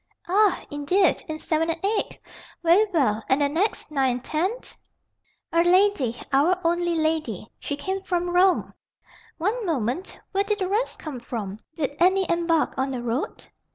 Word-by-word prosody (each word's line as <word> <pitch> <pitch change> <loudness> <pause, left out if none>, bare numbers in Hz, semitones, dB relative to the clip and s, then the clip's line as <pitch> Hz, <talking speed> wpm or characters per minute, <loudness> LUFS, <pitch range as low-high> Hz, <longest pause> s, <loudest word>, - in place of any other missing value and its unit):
"Ah, 400 +2 +3
indeed, 315 +6 +2
in 315 - -4
7 320 +1 0
and 330 0 -1
8? 415 +1 -1 0.5
Very 355 +6 +5
well. 225 - +1
And 265 - +3
the 285 - +3
next, 340 +3 -1
9 270 -3 +2
and 245 0 -2
10?" 315 +7 0 1.0
"A 335 0 +4
lady. 355 - +3 0.2
Our 330 +7 +3
only 345 0 +1
lady. 310 - -1
She 285 - -3
came 380 +6 -3
from 355 -2 -1
Rome." 365 +1 +3 0.6
"One 425 +8 -1
moment. 295 - -2
Where 395 +1 +1
did 420 0 0
the 380 -3 -1
rest 430 +6 -1
come 295 -6 -7
from? 215 -4 -5 0.2
Did 285 -3 -2
any 375 +1 +4
embark 335 -2 +1
on 265 +1 0
the 250 -2 -4
road?" 240 +4 -3
330 Hz, 160 wpm, -24 LUFS, 275-370 Hz, 1.0 s, Very